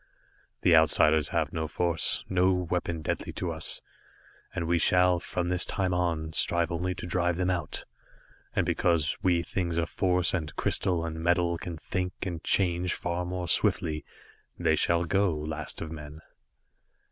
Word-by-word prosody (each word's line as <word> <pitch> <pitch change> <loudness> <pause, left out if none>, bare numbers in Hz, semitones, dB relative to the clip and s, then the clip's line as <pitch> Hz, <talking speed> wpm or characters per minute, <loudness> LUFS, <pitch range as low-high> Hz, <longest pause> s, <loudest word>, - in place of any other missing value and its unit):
"The 85 - +6
Outsiders 80 -1 +4
have - - -1
no 80 -1 -2
force, 85 0 +2
no 95 0 +2
weapon 90 -2 -2
deadly - - -3
to - - -3
us, - - +2 0.7
and 85 - -2
we 85 +1 +1
shall, 90 +1 +4
from 85 0 -3
this 90 0 +1
time 95 -2 -1
on, 85 -3 -1
strive 85 +1 +2
only 90 +2 -2
to - - -7
drive 90 0 0
them 90 +1 0
out, 85 -4 -4 0.7
and - - +1
because 85 -3 +1
we 85 -2 +2
things 85 -2 -3
of 85 0 -1
force 90 -2 +2
and 80 -5 -3
crystal 85 -3 +1
and 80 0 -5
metal 85 0 +2
can 85 -2 -6
think 90 +3 -3
and 85 -4 -5
change 90 -2 +1
far 85 +1 -3
more 90 0 -4
swiftly, 75 -3 +2 0.5
they - - +1
shall 85 0 +2
go, 95 -1 +1
Last 75 0 -4
of 80 - -5
Men. 75 -1 -9
85 Hz, 160 wpm, -28 LUFS, 80-90 Hz, 0.7 s, The